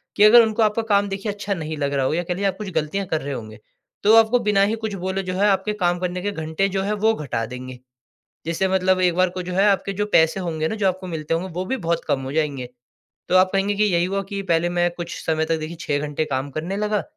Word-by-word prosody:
कि 205 - +4
अगर 235 +3 +9
उनको 220 0 +1
आपका 215 +1 +1
काम 200 0 +3
देखिए 195 +2 -3
अच्छा 205 0 -3
नहीं 160 -3 -5
लग 140 -1 -1
रहा 135 -1 +1
हो, - - 0
या 175 +2 0
कह 180 - -2
लीजिए 200 +3 -1
आप 190 -1 -2
कुछ 210 -2 -5
ग़लतियाँ 190 +6 -1
कर 160 - -1
रहे 140 0 -4
होंगे, 110 -4 -8 0.4
तो 210 - +5
वो 225 - +8
आपको 225 +2 +5
बिना 195 -1 +3
ही - - +1
कुछ 215 - -3
बोले 190 +1 -1
जो 185 - -4
है, 200 +3 +2
आपके 200 +1 +1
काम 175 -3 0
करने 180 0 -3
के 205 +2 -2
घंटे 160 +2 -1
जो 195 0 -1
है 205 +2 -1
वो 220 +2 +2
घटा 135 - -3
देंगे। 125 +1 -8 0.7
जैसे 165 +3 0
मतलब 185 0 +2
एक 180 -2 +3
बार 185 0 +2
को 185 0 -5
जो 180 - -6
है, 190 +2 +3
आपके 195 0 +1
जो 205 +2 -1
पैसे 160 +4 +4
होंगे 160 -3 -2
ना - - -3
जो 205 -2 0
आपको 185 0 -3
मिलते 160 -2 -3
होंगे, 180 +3 -2
वो 180 +3 -3
भी 265 - -1
बहुत 170 -6 -2
कम 135 - +1
हो 130 +1 -5
जाएँगे। 145 -5 -1 0.6
तो 185 - +3
आप 185 0 +5
कहेंगे 195 +1 +1
कि 210 - +3
यही 175 -4 +2
हुआ 195 +2 -1
कि 200 - -3
पहले 165 +1 +3
मैं 175 0 +1
कुछ 175 -1 -6
समय 160 -1 +1
तक 165 - +1
देखिए 155 +2 -6
6 145 -1 -1
घंटे 150 +2 -2
काम 135 -1 -3
करने 165 +7 -4
लगा, 210 0 0
185 Hz, 275 wpm, -22 LUFS, 160-200 Hz, 0.7 s, अगर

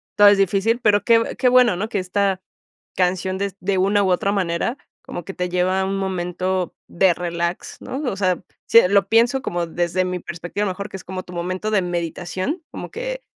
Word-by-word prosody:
todo 205 - +7
es 205 - +5
difícil, 200 +5 +2
pero 210 -3 +3
que 230 -1 +3
que 255 - +3
bueno, 250 -5 +5
¿no? 210 +5 -3
Que 205 -4 -1
esta 190 +1 0 0.5
canción, 185 +1 0
des 200 -1 -3
de 195 +1 0
una 200 +2 +3
u 190 - +1
otra 195 +3 +1
manera, 190 +6 -1 0.3
como 175 - -7
que 195 - -6
te 180 -1 -3
lleva 185 +1 +1
a - - 0
un 195 0 -2
momento, 185 -1 -2 0.2
de 180 0 +4
relax, 170 0 -3
¿no? 265 - -5
O 190 - -5
sea, 185 -2 +1 0.3
sí 230 - +8
lo 200 0 +3
pienso 240 +4 +3
como 175 -9 -2
desde 175 +2 0
mi 180 0 -3
perspectiva, 175 +4 -4
mejor 200 +2 -4
que 195 - -7
es - - -12
como 185 0 -5
tu 180 - -13
momento 185 +4 -3
de 205 -3 +3
meditación, 180 - -3
como - - -7
que, - - -5
190 Hz, 205 wpm, -21 LUFS, 180-205 Hz, 0.5 s, sí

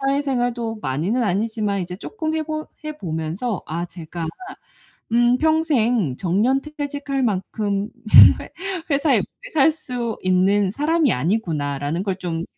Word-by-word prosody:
사회생활도 245 -5 -1
많이는 165 - 0
아니지만 205 0 -1
이제 180 +1 -6
쪼끔 315 - -4
해보 310 0 -3 0.2
해 305 0 -5
보면서 165 +6 -3
아 170 +2 -3
제가 170 -1 -6 0.8
'음. 240 +1 +4
평생 250 - +2
정년퇴직할 275 - -1
만큼 205 -1 -1 0.5
회 - - -9 0.4
회사에 285 +1 +3
오래 - - -7
살 315 +1 +4
수 245 -7 -4
있는 185 +2 +3
사람이 300 +3 +2
아니구나.'라는 150 - -1
걸 190 -2 -1
좀 170 -3 -3
225 Hz, 265 characters per minute, -22 LUFS, 180-275 Hz, 0.8 s, 음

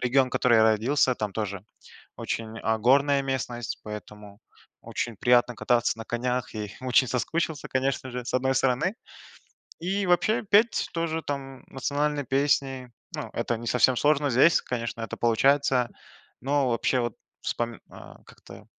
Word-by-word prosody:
Регион, 130 +1 +2
который 120 -2 +3
я 110 - +6
родился, 120 +5 +3
там 105 -4 -4
тоже 100 -3 -4 0.5
очень, 115 0 -4
а, 110 0 +1
горная 140 +4 +3
местность, 125 -4 -4
поэтому 105 -1 -9 0.4
очень 120 -3 -4
приятно 120 +1 +3
кататься 120 -2 +1
на 115 - -6
конях 125 +1 -2
и 105 -2 -5
очень 130 0 +3
соскучился 155 +4 -2
конечно 130 0 -1
же, 125 0 -5
с - - -5
одной 130 +1 +1
стороны. 135 - +1 0.9
И 195 +3 -1
вообще, 180 +6 +2
петь- 210 +2 +3
тоже, 165 -1 -2
там, 135 -3 -6
национальные 145 +1 -1
песни, 135 -1 0 0.2
ну, - - -5
это 120 - -1
не 120 - -8
совсем 125 +1 +3
сложно 145 +1 +2
здесь, 135 +8 +5
конечно, 115 -2 -4
это 115 - -5
получается. 125 +1 +2 0.5
Но 135 +1 +1
вообще 125 +2 +1
вот 120 -3 -2 0.3
вспоми 120 -1 -3
а - - -13
как-то, - - -15
125 Hz, 145 wpm, -26 LUFS, 120-140 Hz, 0.9 s, я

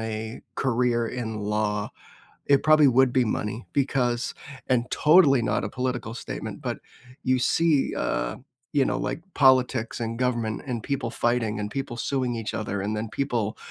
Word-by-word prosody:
a 110 +1 -5
career 120 -2 +1
in 115 -3 -4
law, 105 0 -1 0.6
it 140 -1 +4
probably 155 -2 +6
would 130 0 +4
be 130 -1 +3
money, 105 +1 -3
because- 125 -3 0 0.3
and 125 -1 +1
totally 150 -6 +5
not - - 0
a - - -2
political 125 -3 -3
statement- - - -6
but - - -3 0.4
you 130 0 +2
see, 155 +2 +2
uh, - - -1 0.4
you 140 -2 +3
know, - - -1
like, 160 - -3
politics 130 -4 +3
and 115 0 -3
government 120 -4 -1
and 120 -4 -3
people 140 -2 -2
fighting 115 -3 0
and 105 0 -3
people 135 -2 -4
suing 125 0 -1
each 115 -2 -4
other 100 -2 -3
and 105 +2 -2
then 110 +1 -3
people, 115 -3 -2
120 Hz, 160 wpm, -25 LUFS, 110-130 Hz, 0.6 s, probably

